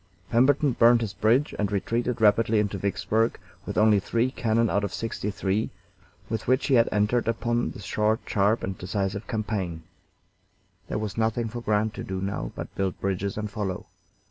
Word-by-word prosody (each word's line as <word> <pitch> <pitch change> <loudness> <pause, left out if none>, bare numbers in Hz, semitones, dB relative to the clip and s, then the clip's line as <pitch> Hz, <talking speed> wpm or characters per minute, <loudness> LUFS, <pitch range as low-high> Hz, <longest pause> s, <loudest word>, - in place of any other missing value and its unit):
Pemberton 135 +4 +4
burned 120 0 +5
his 110 -3 -3
bridge 120 +7 +2
and 105 -1 0
retreated 115 +4 -1
rapidly 110 +1 +4
into 100 -2 -1
Vicksburg, 110 +3 0 0.3
with - - -4
only 105 -1 +5
three 115 +6 0
cannon 115 -2 +1
out 100 -1 0
of 100 - -2
sixty 115 -2 -3
three 100 +1 -1 0.6
with 110 -1 -4
which 130 +2 +2
he 140 - +1
had 115 -2 +5
entered 105 +4 +1
upon 120 +1 0
this 100 - -9
short, 105 +4 +1
sharp, 105 +3 +1
and 95 0 -3
decisive 100 +2 -3
campaign. 100 -7 -3 1.0
There - - -2
was 110 +1 -3
nothing 115 +1 0
for 120 +2 -6
Grant 105 -1 +1
to - - -6
do 95 0 -4
now 95 -11 -3
but - - -7
build 95 -2 -2
bridges 100 +1 -2
and 105 0 -2
follow. 100 -3 -4
110 Hz, 175 wpm, -26 LUFS, 100-115 Hz, 1.0 s, burned